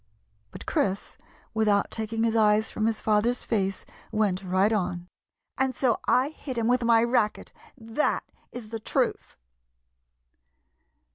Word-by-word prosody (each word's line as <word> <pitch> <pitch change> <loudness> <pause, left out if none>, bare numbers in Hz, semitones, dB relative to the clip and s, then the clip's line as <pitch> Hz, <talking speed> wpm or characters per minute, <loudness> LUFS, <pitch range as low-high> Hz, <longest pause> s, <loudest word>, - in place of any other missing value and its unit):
But - - -10
Chris, 195 0 -1 0.3
without 210 -2 +2
taking 225 0 -2
his 230 0 +1
eyes 215 0 +3
from 215 - 0
his 225 -1 -1
father's 220 +3 +2
face, 195 -4 -1 0.3
went 210 -4 +1
right 190 +4 +2
on 180 -3 -2 0.2
— - - -61
" - - -54
and 265 -1 +1
so 245 -4 +1
I 260 +3 +3
hit 275 -4 -7
him 230 - 0
with 245 +1 +2
my 230 -1 +5
racket. 235 -3 0 0.3
That 230 +4 -1 0.3
is 240 -3 -8
the 225 0 -5
truth." - - -2
220 Hz, 145 wpm, -26 LUFS, 210-235 Hz, 0.3 s, my